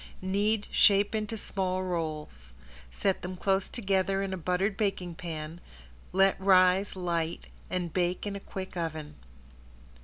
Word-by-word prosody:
Knead, 205 Hz, +3 st, +1 dB
shape 200 Hz, +1 st, +5 dB
into 220 Hz, 0 st, -2 dB
small 185 Hz, -2 st, -1 dB
rolls. 155 Hz, -, -4 dB, 0.4 s
Set 190 Hz, -, 0 dB
them 185 Hz, +1 st, -5 dB
close 195 Hz, +1 st, +1 dB
together 195 Hz, -3 st, +1 dB
in 195 Hz, -1 st, -3 dB
a -, -, 0 dB
buttered 185 Hz, +3 st, 0 dB
baking 195 Hz, -4 st, -1 dB
pan, 165 Hz, 0 st, -6 dB, 0.5 s
let 195 Hz, 0 st, +3 dB
rise 190 Hz, +1 st, +5 dB
light, 170 Hz, -3 st, -2 dB, 0.2 s
and 180 Hz, -3 st, -2 dB
bake 180 Hz, +1 st, 0 dB
in 205 Hz, -1 st, -3 dB
a -, -, -4 dB
quick 190 Hz, -1 st, -7 dB
oven. 155 Hz, -3 st, -4 dB
185 Hz, 140 wpm, -29 LUFS, 170-195 Hz, 0.5 s, shape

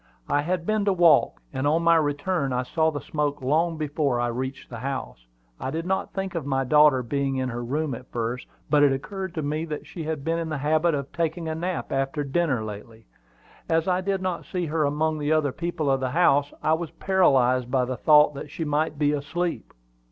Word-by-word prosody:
"I 145 Hz, -, +2 dB
had 170 Hz, +2 st, -2 dB
been 215 Hz, 0 st, +1 dB
to 200 Hz, -, +3 dB
walk; 165 Hz, -, +4 dB
and 130 Hz, +2 st, -1 dB
on 160 Hz, +3 st, +2 dB
my 170 Hz, 0 st, +5 dB
return 145 Hz, 0 st, 0 dB
I 125 Hz, 0 st, 0 dB
saw 160 Hz, +5 st, +1 dB
the 145 Hz, -2 st, -4 dB
smoke 145 Hz, -2 st, -2 dB
long 160 Hz, +5 st, +1 dB
before 145 Hz, -4 st, 0 dB
I 120 Hz, 0 st, 0 dB
reached 130 Hz, +3 st, -4 dB
the 120 Hz, -, -6 dB
house. 130 Hz, -, -5 dB, 0.3 s
I -, -, -3 dB
did 165 Hz, +4 st, -3 dB
not 190 Hz, +1 st, -1 dB
think 195 Hz, 0 st, -4 dB
of 165 Hz, -3 st, -3 dB
my 135 Hz, -1 st, 0 dB
daughter 150 Hz, -1 st, +5 dB
being 135 Hz, +2 st, -1 dB
in 130 Hz, -1 st, -1 dB
her 120 Hz, 0 st, -4 dB
room 145 Hz, +4 st, -2 dB
at 125 Hz, +2 st, -9 dB
first, 120 Hz, +2 st, -3 dB, 0.2 s
but 150 Hz, -1 st, +3 dB
it 145 Hz, -1 st, +5 dB
occurred 190 Hz, +7 st, -4 dB
to 155 Hz, -, -2 dB
me 150 Hz, +2 st, -1 dB
that 150 Hz, -2 st, -6 dB
she 170 Hz, -, -7 dB
has 160 Hz, 0 st, -2 dB
been 165 Hz, +4 st, -2 dB
in 165 Hz, -1 st, -3 dB
the 150 Hz, -, -2 dB
habit 155 Hz, +3 st, +2 dB
of 140 Hz, -1 st, -5 dB
taking 165 Hz, 0 st, -2 dB
a 160 Hz, -, -1 dB
nap 170 Hz, +2 st, -3 dB
after 135 Hz, +2 st, -1 dB
dinner 140 Hz, -4 st, 0 dB
lately. 110 Hz, +1 st, -9 dB, 0.6 s
As 165 Hz, +1 st, +2 dB
I 185 Hz, 0 st, +2 dB
did 195 Hz, 0 st, -1 dB
not 185 Hz, -2 st, -2 dB
see 180 Hz, -2 st, -3 dB
her 155 Hz, -1 st, 0 dB
among 155 Hz, +2 st, 0 dB
the 150 Hz, +1 st, -1 dB
other 155 Hz, -3 st, +2 dB
people 160 Hz, -2 st, -2 dB
of 135 Hz, -, +2 dB
the 130 Hz, -1 st, -1 dB
house, 145 Hz, -2 st, +3 dB
I 155 Hz, -, +3 dB
was 165 Hz, 0 st, -2 dB
paralyzed 130 Hz, -10 st, +2 dB
by 130 Hz, -1 st, +2 dB
the 130 Hz, +1 st, -3 dB
thought 150 Hz, +3 st, +5 dB
that 145 Hz, +1 st, -7 dB
she 160 Hz, +3 st, -4 dB
might 150 Hz, 0 st, 0 dB
be 145 Hz, 0 st, +2 dB
asleep." 165 Hz, +4 st, -3 dB
150 Hz, 225 wpm, -25 LUFS, 135-165 Hz, 0.6 s, my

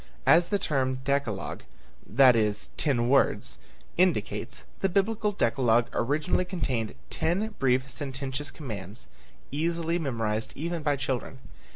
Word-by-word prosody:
As 170 Hz, +1 st, +6 dB
the 205 Hz, -, +1 dB
term 130 Hz, -7 st, 0 dB
"decalogue," 135 Hz, -8 st, -1 dB, 0.5 s
that 130 Hz, +1 st, +6 dB
is 105 Hz, -2 st, 0 dB
"ten 120 Hz, -5 st, +1 dB
words," 135 Hz, +2 st, +2 dB, 0.4 s
indicates, 175 Hz, -, 0 dB
the 195 Hz, -, +1 dB
Biblical 210 Hz, +3 st, +1 dB
decalogue 120 Hz, -, +2 dB
originally 150 Hz, +8 st, +1 dB
contained 135 Hz, -, -2 dB, 0.2 s
ten 200 Hz, +6 st, 0 dB
brief 130 Hz, 0 st, +2 dB
sententious 135 Hz, 0 st, -4 dB
commands, 105 Hz, -, -7 dB, 0.4 s
easily 165 Hz, +3 st, 0 dB
memorized 115 Hz, -7 st, -2 dB
even 170 Hz, +2 st, -3 dB
by 145 Hz, -1 st, +1 dB
children. 135 Hz, -1 st, -3 dB
140 Hz, 115 wpm, -28 LUFS, 120-170 Hz, 0.5 s, As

